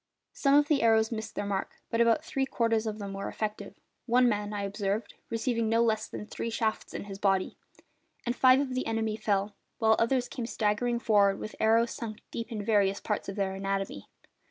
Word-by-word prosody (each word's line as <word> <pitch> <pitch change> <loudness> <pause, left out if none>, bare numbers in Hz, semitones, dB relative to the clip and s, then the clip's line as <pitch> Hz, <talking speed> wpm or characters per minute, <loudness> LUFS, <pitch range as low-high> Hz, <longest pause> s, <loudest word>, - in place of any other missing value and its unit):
Some 275 0 +3
of 290 0 +5
the 295 -2 +2
arrows 225 0 +4
missed 220 -1 -5
their - - -2
mark, 195 -1 -3 0.2
but 230 - +2
about 230 -1 +3
three 270 0 -1
quarters 230 -3 +1
of 215 -1 -3
them 200 -2 -6
were 195 0 -4
effective 215 -1 -4 0.3
one 250 +1 +5
man, 210 -2 0
I 205 -1 -3
observed, 200 +1 -2 0.2
receiving 230 -1 0
no 230 +1 +3
less 220 -2 +1
than - - -7
three 230 - -4
shafts 220 -1 -2
in - - -4
his 200 -1 -8
body 195 -2 +1 0.7
and 240 0 -1
five 260 0 +6
of 275 -2 -1
the 255 - -2
enemy 225 -1 -1
fell, 205 -1 0 0.2
while 220 -1 +4
others 245 +2 +2
came 240 -2 -5
staggering 225 +2 0
forward 205 -4 +3
with 215 - -7
arrows 230 +2 +3
sunk 215 -2 -6
deep 230 +1 -5
in 210 -3 -4
various 200 -3 +2
parts 210 -2 -3
of 195 - -5
their 195 -2 -1
anatomy. 195 - -3
220 Hz, 205 wpm, -29 LUFS, 205-230 Hz, 0.7 s, five